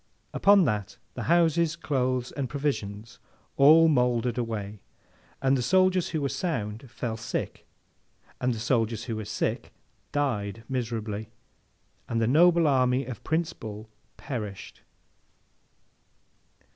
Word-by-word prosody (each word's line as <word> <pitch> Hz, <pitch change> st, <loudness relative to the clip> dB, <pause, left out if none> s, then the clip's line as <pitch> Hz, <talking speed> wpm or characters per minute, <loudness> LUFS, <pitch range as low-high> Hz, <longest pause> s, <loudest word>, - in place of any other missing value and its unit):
Upon 200 Hz, -2 st, +5 dB
that, 105 Hz, -6 st, -2 dB, 0.2 s
the -, -, -6 dB
houses, 170 Hz, -1 st, +3 dB
clothes, 130 Hz, -5 st, -1 dB
and 135 Hz, -3 st, -4 dB
provisions, 115 Hz, -7 st, -4 dB, 0.4 s
all 160 Hz, +4 st, +7 dB
mouldered 125 Hz, -5 st, +2 dB
away; 105 Hz, -3 st, -4 dB, 0.6 s
and 135 Hz, 0 st, +4 dB
the 130 Hz, -, 0 dB
soldiers 185 Hz, +5 st, +3 dB
who 155 Hz, -3 st, -2 dB
were 140 Hz, -, 0 dB
sound, 120 Hz, -, -3 dB
fell 115 Hz, -1 st, -4 dB
sick; 110 Hz, -, -5 dB, 0.7 s
and 125 Hz, -, +1 dB
the 115 Hz, -, -3 dB
soldiers 115 Hz, -1 st, 0 dB
who 115 Hz, -2 st, -4 dB
were 110 Hz, -, -5 dB
sick, -, -, -3 dB, 0.4 s
died 115 Hz, -7 st, -2 dB
miserably: 110 Hz, -4 st, -3 dB, 0.8 s
and 115 Hz, -, 0 dB
the 115 Hz, -, +2 dB
noble 170 Hz, +6 st, +5 dB
army 130 Hz, -2 st, +2 dB
of 120 Hz, -4 st, -8 dB
Prince 165 Hz, +1 st, -1 dB
Bull 110 Hz, -2 st, -9 dB, 0.3 s
perished. 105 Hz, -7 st, -6 dB
125 Hz, 120 wpm, -27 LUFS, 110-150 Hz, 0.8 s, all